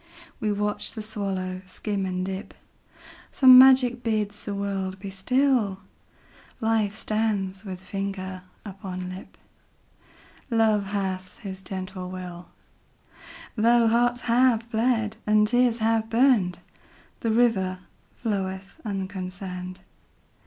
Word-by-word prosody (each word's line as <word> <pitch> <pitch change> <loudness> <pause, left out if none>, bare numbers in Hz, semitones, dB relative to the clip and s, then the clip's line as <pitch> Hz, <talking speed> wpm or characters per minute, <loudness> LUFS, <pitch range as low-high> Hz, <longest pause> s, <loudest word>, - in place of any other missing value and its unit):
We 215 - 0
watch 210 0 -1
the 220 - -6
swallow 195 -4 -3
skim 195 0 -3
and 185 0 -2
dip; 190 +1 -6 0.8
Some 255 -2 +9
magic 255 -2 +6
bids 210 -3 -2
the 205 - -3
world 195 -1 -3
be 195 0 -7
still; 220 -1 +1 0.8
Life 220 -3 +1
stands 210 -3 -1
with 190 -3 -6
finger 190 -1 -5 0.2
upon 185 -2 -6
lip; 185 - -11 1.1
Love 220 -4 +2
hath 190 -2 -3
his 190 -3 -7
gentle 185 -1 -6
will; 180 -1 -8 1.1
Though 235 +1 +4
hearts 240 +2 +2
have 235 -1 +3
bled, 225 -2 +1
and 210 0 +4
tears 245 0 +3
have 225 0 +1
burned, 230 -7 +3 0.6
The 230 - -1
river 220 -5 +2 0.4
floweth 195 +3 -4
unconcerned. 185 -2 -5
205 Hz, 110 wpm, -25 LUFS, 190-225 Hz, 1.1 s, Some